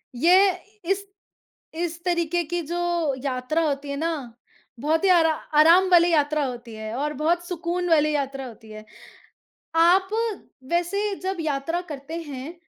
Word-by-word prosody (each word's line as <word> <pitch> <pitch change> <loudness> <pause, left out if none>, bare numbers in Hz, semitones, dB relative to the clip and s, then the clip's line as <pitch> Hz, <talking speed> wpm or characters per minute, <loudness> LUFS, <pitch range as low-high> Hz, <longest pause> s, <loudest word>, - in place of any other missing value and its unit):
ये 370 +8 +5 0.3
इस, 395 +2 -1 0.7
इस 340 0 -4
तरीके 345 -1 0
की 345 +3 -3
जो 345 +1 -3 0.4
यात्रा 260 +4 -1
होती 280 0 -3
है 280 - -3
ना, 300 -7 -3 0.5
बहुत 315 +6 0
ही 385 - +4
आरा 330 -3 +5 0.3
आराम 350 +4 +6
वाली 345 0 +6
यात्रा 300 -1 +2
होती 240 -2 -7
है 220 0 -6
और 300 +3 -2
बहुत 345 +2 +1
सुकून 355 0 -2
वाली 305 -2 +4
यात्रा 275 -1 -3
होती 220 -1 -14
है। 215 0 -10 0.9
आप 360 +4 +4 0.6
वैसे 395 +4 0
जब 380 -1 -2
यात्रा 315 +3 -2
करते 295 +4 -6
हैं, 285 0 -7
325 Hz, 145 wpm, -24 LUFS, 280-350 Hz, 0.9 s, आराम